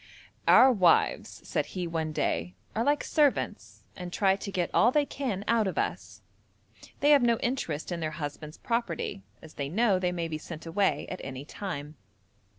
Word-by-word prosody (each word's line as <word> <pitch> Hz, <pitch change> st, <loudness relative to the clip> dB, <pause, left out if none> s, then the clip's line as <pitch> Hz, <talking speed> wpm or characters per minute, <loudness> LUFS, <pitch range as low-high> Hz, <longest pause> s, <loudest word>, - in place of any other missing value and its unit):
'Our 260 Hz, +1 st, +8 dB
wives,' 185 Hz, -8 st, +2 dB
said -, -, -1 dB
he 180 Hz, -, -1 dB
one 160 Hz, -2 st, -2 dB
day, 90 Hz, -, -1 dB, 0.2 s
'are 225 Hz, -, +1 dB
like 290 Hz, +3 st, +2 dB
servants, 295 Hz, -4 st, 0 dB
and 180 Hz, -1 st, -7 dB
try 195 Hz, +1 st, +3 dB
to 200 Hz, +1 st, -6 dB
get 180 Hz, -3 st, -1 dB
all 240 Hz, -, +5 dB
they 295 Hz, +1 st, +2 dB
can 245 Hz, -10 st, -3 dB
out 230 Hz, -2 st, +3 dB
of 190 Hz, -, -4 dB
us; -, -, -3 dB, 0.8 s
they 290 Hz, -, +5 dB
have 285 Hz, -2 st, +7 dB
no 235 Hz, -1 st, +3 dB
interest 180 Hz, -, -2 dB
in 175 Hz, -, -2 dB
their 160 Hz, -1 st, -2 dB
husband's 150 Hz, 0 st, -6 dB
property, 230 Hz, -, -2 dB, 0.2 s
as 160 Hz, -, -12 dB
they 140 Hz, -1 st, -4 dB
know 200 Hz, +2 st, +2 dB
they 180 Hz, -1 st, 0 dB
may 170 Hz, -2 st, -2 dB
be 155 Hz, -1 st, -4 dB
sent 165 Hz, 0 st, -9 dB
away 165 Hz, -3 st, +1 dB
at -, -, -6 dB
any 135 Hz, +1 st, -6 dB
time.' 150 Hz, -5 st, -6 dB
180 Hz, 180 wpm, -28 LUFS, 155-230 Hz, 0.8 s, Our